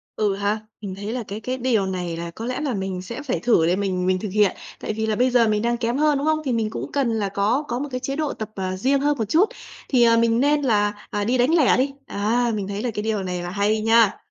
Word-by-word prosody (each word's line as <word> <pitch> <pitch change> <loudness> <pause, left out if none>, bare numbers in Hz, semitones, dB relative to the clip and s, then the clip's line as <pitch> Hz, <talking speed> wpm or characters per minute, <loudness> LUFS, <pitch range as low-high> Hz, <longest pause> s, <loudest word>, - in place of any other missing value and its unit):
Ừ, 205 -2 +1
ha. 205 +2 -1 0.2
Mình 195 -3 -5
thấy 205 +3 -5
là 250 -2 -3
cái 205 +2 -5
cái 255 +4 -3
điều 240 -6 +1
này 180 -3 -3
là 170 0 -5
có 220 +6 -7
lẽ 255 +3 -3
là 285 -4 -1
mình 190 -2 -3
sẽ 190 +6 -7
phải 265 -3 -2
thử 230 -9 +3
để 175 +2 +2
mình 185 -2 -1
mình 185 0 +2
thực 210 - -4
hiện. 205 0 +2 0.2
Tại - - -3
vì 220 +1 -2
là 215 - +1
bây 250 +4 +3
giờ 240 -2 +4
mình 210 -1 +1
đang 235 +1 0
kém 235 +1 -1
hơn, 300 -1 +3
đúng 285 +2 -2
không? 310 0 +2
Thì 260 - 0
mình 225 -2 0
cũng - - -6
cần 275 -4 +1
là 215 -3 -1
có 210 +8 +1
có 240 +1 -2
một 290 +2 -4
cái 255 - -2
chế 270 +2 -3
độ 305 -1 -1
tập, 215 - -6
ờ, 185 -1 -3
riêng 270 +8 +2
hơn 290 0 +1
một 225 - -1
chút, 360 - +4 0.4
thì, 250 -3 +4
ờ, 230 -1 +5
mình 230 0 +3
nên 290 +2 +3
là, 210 -5 0
à, 205 - -2
đi 240 +5 +1
đánh 255 +7 +3
lẻ 300 -7 +4
đi. 270 +2 0
Á, 230 +4 0
mình 200 -2 -3
thấy 200 +1 -4
là 245 - -1
cái 210 - -3
điều 215 -3 -1
này 180 -1 -3
là 175 - -4
hay 205 +3 +1
nha. 225 -1 +4
225 Hz, 295 wpm, -23 LUFS, 200-255 Hz, 0.4 s, ờ